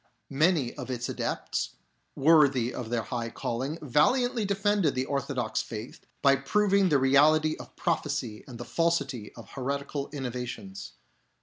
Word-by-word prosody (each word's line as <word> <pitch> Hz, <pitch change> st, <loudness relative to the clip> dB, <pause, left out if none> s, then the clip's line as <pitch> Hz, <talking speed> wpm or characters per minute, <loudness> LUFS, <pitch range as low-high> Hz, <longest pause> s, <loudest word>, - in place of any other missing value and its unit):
Many 150 Hz, -3 st, +2 dB
of -, -, -6 dB
its 125 Hz, -1 st, -3 dB
adepts, -, -, -3 dB, 0.4 s
worthy 140 Hz, -5 st, +4 dB
of 120 Hz, -3 st, -5 dB
their 120 Hz, -1 st, 0 dB
high 115 Hz, -1 st, -3 dB
calling, 130 Hz, +7 st, -3 dB
valiantly 230 Hz, -, +2 dB
defended 200 Hz, -5 st, +1 dB
the 130 Hz, +1 st, 0 dB
orthodox 140 Hz, -2 st, -1 dB
faith 110 Hz, +2 st, -8 dB, 0.2 s
by 140 Hz, 0 st, +6 dB
proving 200 Hz, +7 st, +2 dB
the 150 Hz, -, +4 dB
reality 150 Hz, +4 st, +4 dB
of -, -, -12 dB
prophecy 145 Hz, -, -2 dB
and 125 Hz, -3 st, -9 dB
the 120 Hz, -, -7 dB
falsity 140 Hz, -10 st, -1 dB
of 115 Hz, -4 st, -12 dB
heretical 140 Hz, +1 st, -3 dB
innovations. 125 Hz, -, -6 dB
140 Hz, 135 wpm, -28 LUFS, 125-155 Hz, 0.4 s, by